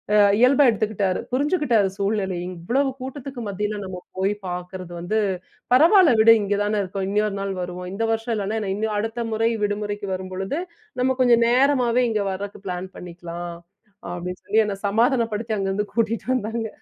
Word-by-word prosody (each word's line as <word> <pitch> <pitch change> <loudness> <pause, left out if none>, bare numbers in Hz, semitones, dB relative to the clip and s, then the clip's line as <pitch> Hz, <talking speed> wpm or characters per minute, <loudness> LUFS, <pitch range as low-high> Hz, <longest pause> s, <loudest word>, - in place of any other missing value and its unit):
அ - - +6 0.2
இயல்பா 265 +3 +6
எடுத்துக்கிட்டாரு. 210 -4 0
புரிஞ்சுக்கிட்டாரு 260 - +2
சூழ்நிலைய. 195 -3 -1
"இவ்வளவு 265 +11 0
கூட்டத்துக்கு 265 -1 -6
மத்தியில 210 +1 -2
நம்ம 185 -1 -6 0.2
போய் 195 +2 +1
பாக்கிறது 180 0 -6
வந்து 180 +6 -1 0.6
பரவாயில்ல 330 - +7
விடு. 225 +1 +8
இங்கே 200 0 0
தானே 210 0 0
இருக்கோம். 190 0 -4
இன்னொரு 210 0 +1
நாள் 195 0 -2
வருவோம். 180 0 -5
இந்த 225 +3 -2
வருஷம் 225 +1 -1
இல்லைனா 210 +1 -2
என்ன 195 -3 -2
இன்னும் 215 0 -1
அடுத்த 225 +3 -2
முறை 225 +1 +2
விடுமுறைக்கு 205 0 -2
வரும்பொழுது, 185 - -4 0.4
நம்ம 260 0 +2
கொஞ்சம் 235 -2 +5
நேரமாவே 250 -1 +3
இங்கே 210 -2 0
வரக்கு 200 +1 -6
பிளான் 180 +1 -4
பண்ணிக்கலாம்." 175 0 -7 0.6
அப்டின்னு 180 +1 -5
சொல்லி 220 +2 +3
என்ன 205 - -2
சமாதானப்படுத்தி 230 -1 +1
அங்கேருந்து 195 +2 -1
கூட்டிட்டு 230 -1 0
வந்தாங்க. 225 -1 -2
210 Hz, 155 wpm, -23 LUFS, 190-235 Hz, 0.6 s, விடு